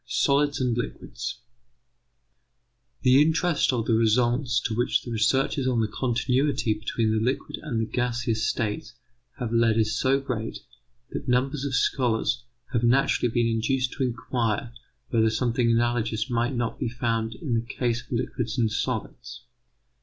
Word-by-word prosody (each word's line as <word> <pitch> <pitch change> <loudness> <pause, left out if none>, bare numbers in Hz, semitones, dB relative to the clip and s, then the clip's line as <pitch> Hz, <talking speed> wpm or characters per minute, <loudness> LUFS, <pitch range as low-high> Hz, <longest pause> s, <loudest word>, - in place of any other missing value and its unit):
SOLIDS 145 +1 +2
AND 125 -3 +1
LIQUIDS 120 0 -5 1.7
The 130 +1 +6
interest 160 0 +2
of 120 -3 -1
the 115 - +1
results 120 +3 +2
to 115 - -2
which 120 +2 +1
the 120 - -7
researches 130 +4 +1
on 125 -2 +1
the 110 - +2
continuity 125 +2 0
between 110 +1 -1
the 110 0 +1
liquid 130 +3 -2
and 130 -7 -2
the 115 - +1
gaseous 120 -1 -1
states 120 +3 -3 0.4
have 120 -3 -3
led 115 -1 +3
is 110 -1 +1
so 135 +1 +2
great, 120 -5 -4 0.5
that 140 - -5
numbers 130 +3 +1
of 135 -3 -1
scholars 120 -2 +1 0.3
have 115 - +2
naturally 120 0 +3
been 120 0 +2
induced 125 +3 0
to 135 - -2
inquire 115 -2 -1 0.4
whether 110 -2 +3
something 115 +1 +1
analogous 115 0 +1
might 120 +2 0
not 120 -1 -2
be - - -1
found 115 -1 -1
in 135 -2 -4
the 115 - +2
case 120 0 -2
of - - -22
liquids 120 0 -2
and 115 -3 +2
solids. 120 +1 -4
120 Hz, 155 wpm, -26 LUFS, 115-130 Hz, 1.7 s, The